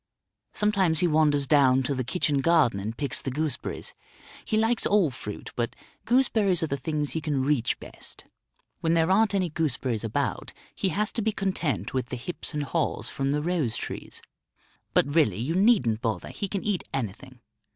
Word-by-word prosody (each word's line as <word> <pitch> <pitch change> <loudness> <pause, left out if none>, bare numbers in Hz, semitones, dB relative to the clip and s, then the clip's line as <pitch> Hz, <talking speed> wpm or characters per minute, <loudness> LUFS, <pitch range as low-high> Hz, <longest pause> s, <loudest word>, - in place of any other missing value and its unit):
Sometimes 195 -6 +2
he 180 - +4
wanders 150 -3 +3
down 135 -2 +4
to 140 - -1
the 130 -1 -1
kitchen 145 +2 +1
garden 155 -9 +3
and 110 +3 -5
picks 140 -4 -1
the - - -3
gooseberries; 150 +1 -2 0.5
he 215 - 0
likes 225 +2 +2
all 195 -8 +3
fruit, 105 -4 -7
but 120 -1 -2 0.3
gooseberries 220 -8 +3
are 155 - -1
the - - +2
things 150 +1 -2
he 160 - -2
can 145 -4 0
reach 135 -4 +1
best. - - -11 0.5
When 165 0 +1
there 165 +2 +3
aren't 210 +1 +3
any 185 -4 0
gooseberries 130 -8 -1
about, 115 - -2 0.2
he 190 - -1
has 210 +6 -1
to 230 - -2
be 220 +1 +1
content 190 - -2
with 130 -2 -1
the 125 - -4
hips 170 +9 -6
and 150 -2 -2
haws 160 +3 -1
from 135 0 -2
the 150 +1 0
rose 160 -9 0
trees. - - -6 0.7
But 145 - +3
really, 145 - +3
you 125 +9 -1
needn't 185 - +3
bother, 110 -3 -2
he 200 - -4
can 195 0 -3
eat 205 -4 -1
anything. 130 +1 -5
150 Hz, 180 wpm, -26 LUFS, 130-185 Hz, 0.7 s, he